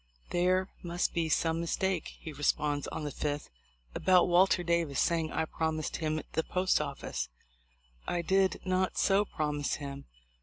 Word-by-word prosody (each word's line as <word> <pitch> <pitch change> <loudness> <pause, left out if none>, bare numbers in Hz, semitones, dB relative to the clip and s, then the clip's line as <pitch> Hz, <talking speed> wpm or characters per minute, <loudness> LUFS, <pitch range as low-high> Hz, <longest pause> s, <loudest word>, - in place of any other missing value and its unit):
"There 185 +2 +2
must 175 0 -1
be 165 -2 0
some 165 +1 +2
mistake," 180 +1 -1
he 160 - -7
responds 145 0 0
on - - -5
the 145 - -3
5th, 145 +1 -3 0.4
"about 180 -2 +4
Walter 180 +1 +4
Davis 170 -5 +1
saying 165 -2 +1
I - - 0
promised 160 -1 -2
him 155 -1 -1
the - - +2
post 185 -2 +1
office. 140 - -4 0.8
I 175 -1 -1
did 190 +2 +2
not 185 0 0
so 200 +1 +3
promise 150 -5 -1
him. 140 -1 -7
165 Hz, 150 wpm, -31 LUFS, 150-180 Hz, 0.8 s, about